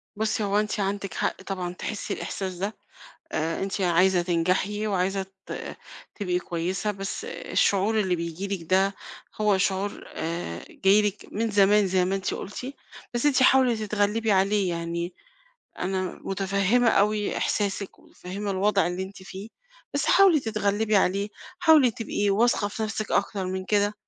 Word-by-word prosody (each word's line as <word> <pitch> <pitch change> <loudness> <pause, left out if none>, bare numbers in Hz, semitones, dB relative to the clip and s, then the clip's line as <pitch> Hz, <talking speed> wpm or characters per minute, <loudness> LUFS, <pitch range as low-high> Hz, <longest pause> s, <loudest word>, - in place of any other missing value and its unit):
بُصّي 215 0 0
هو 200 0 +2
أنتِ 210 0 -1
عندِك 195 -2 -2
حق - - -2
طبعًا 185 -2 -4
تحسي 205 +3 -4
الإحساس 190 -2 -4
ده، 195 +4 -4 0.6
آآ، 160 +3 -1
أنتِ 195 +1 -2
عايزة 180 0 +3
تنجحي 185 +5 0
وعايزة 195 -1 0 0.2
ت - - -6 0.4
تبقي 180 -4 -1
كويسة، 180 +4 -2
بس 195 - -5
الشعور 215 - +1
اللي 185 -3 +1
بييجي 170 +3 -4
لكِ 195 -3 -3
ده 190 +4 +2 0.5
هو 210 -2 +3
شعور 195 +1 -1
آآ، 160 - -4
جاي 200 +2 +4
لِك 210 0 -2
من 225 +2 -1
زمان 205 0 +5
زي 185 -1 +2
ما 190 +2 0
أنتِ 195 - -2
قُلتِ، 250 +7 -6 0.4
بس 240 +4 +1
أنتِ 270 -3 +4
حاولي 260 -2 +5
تتغلبي 215 +1 0
عليه 195 0 +2
يعني، 170 +1 -3 0.7
أنا 185 0 -2
مُتفهّمة 200 +5 +1
أوي 210 0 +2
إحساسِك 200 -1 -1
ومتفهّمة 200 +3 -6
الوضع 195 0 +2
اللي 180 +2 -3
أنتِ 190 0 -10
فيه، 195 +3 -8 0.4
بس 285 - 0
حاولي 375 -5 +6
تتغلبي 215 -2 0
عليه، 200 +1 +2 0.3
حاولي 315 -8 +6
تبقي 205 -2 -1
واثقة 210 +1 +3
في 215 +2 -4
نَفسِك 215 -1 -3
أكثر 200 -1 0
من 185 0 -3
كده، 205 +1 +2
200 Hz, 150 wpm, -26 LUFS, 185-210 Hz, 0.7 s, حاولي